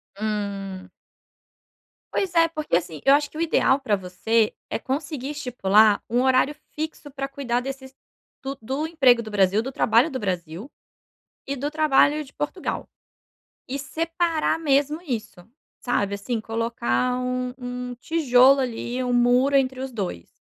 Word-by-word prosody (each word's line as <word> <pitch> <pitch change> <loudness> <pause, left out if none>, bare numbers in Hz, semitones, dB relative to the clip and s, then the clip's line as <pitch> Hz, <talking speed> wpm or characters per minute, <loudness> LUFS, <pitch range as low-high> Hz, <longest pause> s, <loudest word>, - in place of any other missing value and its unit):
Hum. 200 -3 -4 1.2
Pois 365 -3 -1
é 330 0 +5
porque, 305 - -2
assim, 165 -3 -2
eu 275 +1 +7
acho 290 -1 -1
que 310 - -10
o - - -2
ideal 285 -4 +3
pra 220 -7 +1
você 210 +4 0 0.2
é - - -1
conseguir 275 +2 -4
estipular 220 -7 +3
um 245 +2 +2
horário 260 +2 +3 0.2
fixo 310 -1 -5
pra 275 0 -4
cuidar 255 -3 -2
desses 265 0 -7 0.5
do 270 0 -4
do 270 +7 -2
emprego 260 -7 +4
do 215 - -8
Brasil, 200 +1 +3
do 265 +3 -5
trabalho 245 +6 +3
do 260 - -3
Brasil 180 - -4 0.8
e 275 0 -3
do 285 +3 -2
trabalho 305 0 +3
de 275 - -16
Portugal. 295 +7 -4 0.8
E 270 +2 -3
separar 330 +2 -1
mesmo 295 0 +1
isso, 225 - -5 0.4
sabe, 200 -5 0
assim, 225 +4 -3
colocar 230 - -1
um 250 0 -2
um 250 -1 -5
tijolo, 270 -3 +4
ali, 250 0 -3
um 250 - -1
muro 245 +3 +4
entre 260 -1 0
os 265 -1 -5
2. 185 - -5
255 Hz, 150 wpm, -24 LUFS, 220-285 Hz, 1.2 s, eu